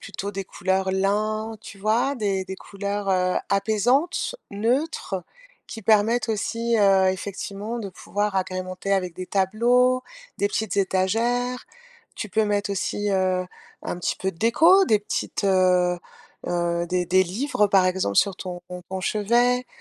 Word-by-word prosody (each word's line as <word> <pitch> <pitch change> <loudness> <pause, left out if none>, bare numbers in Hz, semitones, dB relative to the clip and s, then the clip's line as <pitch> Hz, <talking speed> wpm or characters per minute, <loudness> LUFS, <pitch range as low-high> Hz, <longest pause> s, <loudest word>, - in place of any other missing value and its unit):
plutôt 200 +1 -6
des 195 -1 -5
couleurs 190 +1 -1
lin, 215 +3 0
tu 215 - -11
vois, 225 +7 +1
des 200 -6 -1
des 190 0 -6
couleurs, 200 0 -4
heu 185 -1 +2
apaisantes, 220 - +1 0.2
neutres 225 - -1 0.4
qui 225 - -8
permettent 220 +2 +3
aussi, 230 +2 -1
heu, 195 -2 +5
effectivement 200 +4 -5
de 205 -4 -5
pouvoir 205 +2 -3
agrémenter 185 +1 -2
avec 180 -3 -2
des 185 +1 -6
tableaux, 240 +7 +2 0.4
des 200 - +2
petites 215 0 -2
étagères. 230 +7 0 0.5
Tu 210 - -6
peux 220 +2 +2
mettre 205 -1 0
aussi, 205 +1 -1
heu, 185 -1 +1 0.4
un - - -4
petit 180 - -1
peu 190 0 -2
de 165 - -22
déco, 335 - +5
des 215 - +4
petites, 205 - -3
heu 180 -2 +3 0.5
heu, 175 0 0
des 180 +1 0
des 185 +2 +4
livres, 210 +4 0
par 195 -2 +4
exemple, 185 - 0
sur 200 - +4
ton 180 -1 -7 0.3
on 190 0 -4
chevet 240 +5 +2
200 Hz, 150 wpm, -24 LUFS, 185-225 Hz, 0.5 s, heu